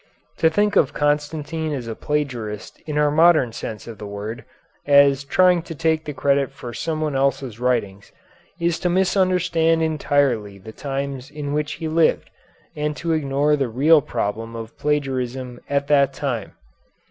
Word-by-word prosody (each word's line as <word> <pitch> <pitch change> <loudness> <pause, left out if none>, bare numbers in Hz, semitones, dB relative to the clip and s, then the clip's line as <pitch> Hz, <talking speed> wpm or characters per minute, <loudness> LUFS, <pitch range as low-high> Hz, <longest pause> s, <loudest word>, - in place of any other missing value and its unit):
To 160 - +4
think 205 +4 +1
of 145 0 +3
Constantine 150 +2 -1
as 130 -4 -4
a 115 - -3
plagiarist 120 -7 -4
in 150 -1 -2
our 150 0 +3
modern 155 -5 +4
sense 110 -1 -6
of 115 -2 -9
the 105 - -7
word, 100 +3 -6 0.4
as 140 -1 +5
trying 180 +4 +3
to 165 0 -8
take 160 +1 0
the 150 - -4
credit 140 0 +1
for 125 -3 -9
someone 155 +1 -2
else's 135 -4 -1
writings, 115 -6 -1 0.5
is 170 -1 0
to 180 - 0
misunderstand 180 -3 +2
entirely 140 -9 0
the 100 +3 -11
times 135 -1 -4
in 145 -1 -5
which 150 0 -1
he 160 - -5
lived, 160 +1 +1 0.4
and 150 -1 -2
to 170 +4 -2
ignore 145 0 +1
the 135 -4 -1
real 145 +7 +5
problem 115 0 -3
of 115 0 -8
plagiarism 130 -4 -2
at 140 0 +1
that 140 -2 +3
time. 125 -8 -3
145 Hz, 160 wpm, -22 LUFS, 125-155 Hz, 0.5 s, as